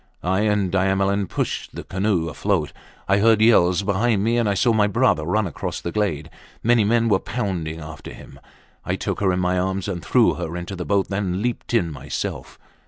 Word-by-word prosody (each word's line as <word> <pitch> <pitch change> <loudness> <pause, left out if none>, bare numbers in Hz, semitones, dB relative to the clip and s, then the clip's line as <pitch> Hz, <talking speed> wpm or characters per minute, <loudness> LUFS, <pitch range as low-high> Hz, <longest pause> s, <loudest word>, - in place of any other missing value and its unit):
I 95 +2 +1
and 105 -3 +1
Diamelen 95 +1 +1
pushed - - -3
the - - -6
canoe 95 -3 -1
afloat. 85 -1 -1 0.3
I 100 +1 +3
heard 110 +1 +4
yells 95 -5 +4
behind 100 +1 +1
me, 115 +2 +2
and 115 -3 +1
I 100 - +1
saw 120 +4 +3
my 105 -2 +3
brother 115 -8 +2
run 105 +5 +1
across 85 - -4
the 85 - -5
glade. 80 -7 -2 0.3
Many 120 -1 +4
men 115 +2 +2
were 105 -4 +3
bounding 95 -8 -3
after 80 -1 -9
him, - - -13 0.4
I - - -1
took - - -3
her 95 -2 +2
in 90 - 0
my 90 0 +1
arms 95 +1 -2
and 90 -4 -4
threw - - +3
her 85 +2 -5
into 90 +2 -6
the 90 -1 -5
boat, 100 -1 +1
then 95 -1 -2
leaped 120 0 -2
in 85 -8 +1
myself. 75 - -5
95 Hz, 200 wpm, -22 LUFS, 90-105 Hz, 0.4 s, heard